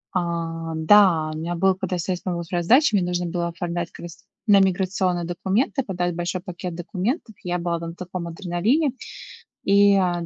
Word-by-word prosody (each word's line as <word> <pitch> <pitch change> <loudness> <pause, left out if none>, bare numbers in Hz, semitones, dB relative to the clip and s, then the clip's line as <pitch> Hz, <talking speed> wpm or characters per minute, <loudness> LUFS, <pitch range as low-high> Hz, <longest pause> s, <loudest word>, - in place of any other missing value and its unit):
А, 165 -2 -2
да, 160 -2 +5
у - - -5
меня 170 +2 -3
было, 190 +2 +3
когда 185 -1 -3
стресс 180 +1 -2
помог 170 -2 -3
справиться 175 0 -2
с - - -10
задачей, 255 -3 +5
мне 180 - +1
нужно 180 0 -1
было 170 0 -2
оформлять 170 0 -4
как - - -12
раз 170 -1 -11 0.2
на 200 -1 +7
миграционные 185 -2 +1
документы, 190 +10 0
подать 175 -3 -2
большой 175 +1 -3
пакет 180 -1 -6
документов. 205 - -3
Я 180 0 -1
была 170 0 -1
тогда 165 0 -5
на 165 - -7
таком 180 -1 -6
адреналине, 195 - 0 0.7
и, 200 0 +5
а, 175 -3 +1
175 Hz, 185 wpm, -23 LUFS, 170-190 Hz, 0.7 s, на